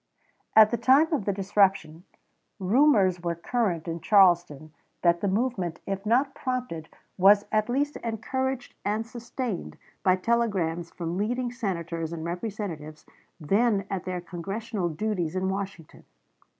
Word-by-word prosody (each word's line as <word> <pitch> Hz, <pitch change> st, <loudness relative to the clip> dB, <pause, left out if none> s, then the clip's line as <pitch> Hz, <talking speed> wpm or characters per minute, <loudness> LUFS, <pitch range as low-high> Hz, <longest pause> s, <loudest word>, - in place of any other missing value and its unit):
At 215 Hz, -1 st, +8 dB
the 235 Hz, -, +1 dB
time 275 Hz, +8 st, +4 dB
of 270 Hz, -10 st, 0 dB
the 200 Hz, -, +1 dB
disruption, 190 Hz, -4 st, +1 dB, 0.5 s
rumors 200 Hz, -3 st, +3 dB
were 170 Hz, -1 st, -2 dB
current 175 Hz, -2 st, -1 dB
in 165 Hz, 0 st, -4 dB
Charleston 175 Hz, -7 st, +3 dB, 0.3 s
that 170 Hz, 0 st, +3 dB
the 205 Hz, -, 0 dB
movement, 195 Hz, -5 st, -1 dB
if 195 Hz, +1 st, -4 dB
not 265 Hz, +5 st, +2 dB
prompted, 250 Hz, -14 st, -4 dB, 0.3 s
was 200 Hz, +2 st, +6 dB
at 215 Hz, +1 st, +1 dB
least 285 Hz, +4 st, 0 dB
encouraged 250 Hz, +3 st, -3 dB
and 215 Hz, +2 st, -1 dB
sustained 235 Hz, -3 st, -5 dB, 0.2 s
by 185 Hz, -1 st, +4 dB
telegrams 185 Hz, -6 st, 0 dB
from 170 Hz, +1 st, -4 dB
leading 245 Hz, +3 st, -1 dB
Senators 170 Hz, -8 st, -3 dB
and 165 Hz, -1 st, -5 dB
Representatives 170 Hz, -5 st, -5 dB, 0.3 s
then 200 Hz, +5 st, +2 dB
at 190 Hz, -3 st, -3 dB
their 180 Hz, -1 st, -3 dB
Congressional 195 Hz, +3 st, -4 dB
duties 175 Hz, -1 st, -2 dB
in 190 Hz, 0 st, 0 dB
Washington. 190 Hz, -4 st, -6 dB
195 Hz, 135 wpm, -27 LUFS, 175-230 Hz, 0.5 s, At